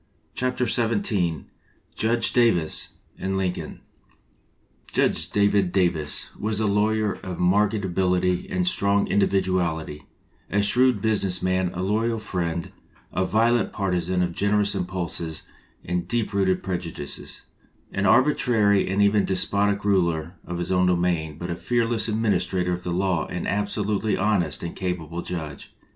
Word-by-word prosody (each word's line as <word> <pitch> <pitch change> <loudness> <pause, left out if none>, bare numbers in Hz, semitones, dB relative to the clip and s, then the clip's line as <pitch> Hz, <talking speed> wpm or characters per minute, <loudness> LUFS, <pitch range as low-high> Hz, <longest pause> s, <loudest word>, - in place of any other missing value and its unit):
177 120 -4 +1
XVII 85 -8 0 0.5
JUDGE 115 +1 +1
DAVIS 110 -10 +2 0.3
AND 95 0 -2
LINCOLN 95 -2 -3 1.1
JUDGE - - +1
DAVID 100 -2 +2
DAVIS 85 -6 0
was 105 0 -1
a 110 - +1
lawyer 105 0 +1
of 90 -2 -6
marked 100 +4 +3
ability 90 0 +1
and 90 -1 0
strong 100 +2 +2
individuality, 90 -6 0 0.4
a 100 +1 +1
shrewd 125 0 +3
business 100 -4 0
man, 95 0 +1
a 90 - -2
loyal 110 +4 0
friend, 85 -5 -3 0.4
a 95 - +1
violent 115 +4 +2
partizan 90 -2 0
of 90 -1 -2
generous 100 +2 +1
impulses 90 -4 -3 0.4
and 90 0 -2
deep 115 -1 -1
rooted 95 -2 +1
prejudices, 85 -5 -4 0.5
an 100 0 +1
arbitrary 110 -6 +3
and 100 +2 +2
even 100 0 +3
despotic 100 +2 +1
ruler 85 -4 +1
of 85 - -5
his 90 +2 -3
own 90 0 +3
domain, 85 -4 0
but 85 +1 -5
a - - -2
fearless 115 +1 0
administrator 95 -5 0
of 90 - -4
the 90 - -5
law 90 -2 0
and 90 - -4
an - - 0
absolutely 105 0 -1
honest 95 -4 0
and 85 - -5
capable 85 -3 -3
judge. 80 -6 -6
95 Hz, 135 wpm, -24 LUFS, 90-105 Hz, 1.1 s, marked